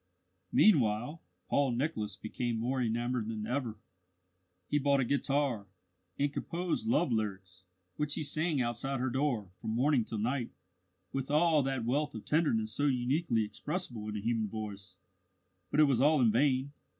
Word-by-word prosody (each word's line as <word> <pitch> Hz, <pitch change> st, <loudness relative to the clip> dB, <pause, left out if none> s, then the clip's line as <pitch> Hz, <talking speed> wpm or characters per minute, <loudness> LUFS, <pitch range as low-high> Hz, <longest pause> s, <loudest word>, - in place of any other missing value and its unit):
Meanwhile, 130 Hz, -, +3 dB, 0.3 s
Paul 140 Hz, -3 st, +2 dB
Nicholas 120 Hz, -, -2 dB
became 115 Hz, +2 st, -3 dB
more 125 Hz, +3 st, -1 dB
enamoured 120 Hz, 0 st, -1 dB
than 110 Hz, -1 st, -4 dB
ever. 120 Hz, -2 st, -2 dB, 0.9 s
He 145 Hz, -, +1 dB
bought 140 Hz, 0 st, +3 dB
a 130 Hz, -, +2 dB
guitar, 135 Hz, -5 st, 0 dB, 0.5 s
and 145 Hz, 0 st, 0 dB
composed 170 Hz, +7 st, -2 dB
love 235 Hz, -, +2 dB
lyrics 95 Hz, -4 st, -3 dB, 0.3 s
which 150 Hz, 0 st, -1 dB
he -, -, -2 dB
sang 155 Hz, +1 st, 0 dB
outside 125 Hz, +2 st, -1 dB
her 130 Hz, 0 st, -1 dB
door, 120 Hz, -8 st, -1 dB
from 110 Hz, -, -2 dB
morning 130 Hz, 0 st, +3 dB
till 110 Hz, -, -5 dB
night, 120 Hz, +3 st, -1 dB, 0.6 s
with 135 Hz, 0 st, -2 dB
all 155 Hz, +1 st, +4 dB
that 135 Hz, -3 st, -1 dB
wealth 145 Hz, +3 st, 0 dB
of 110 Hz, -, -7 dB
tenderness 115 Hz, -9 st, +1 dB
so 145 Hz, +3 st, +1 dB
uniquely 125 Hz, -1 st, +1 dB
expressible 115 Hz, -, -5 dB
in 105 Hz, -, -3 dB
a -, -, -4 dB
human 115 Hz, 0 st, 0 dB
voice 100 Hz, -3 st, -7 dB, 0.7 s
but 145 Hz, -, 0 dB
it -, -, +9 dB
was 135 Hz, -5 st, +3 dB
all 150 Hz, +1 st, +5 dB
in 120 Hz, -4 st, +5 dB
vain. 130 Hz, +3 st, +2 dB
125 Hz, 160 wpm, -32 LUFS, 110-145 Hz, 0.9 s, it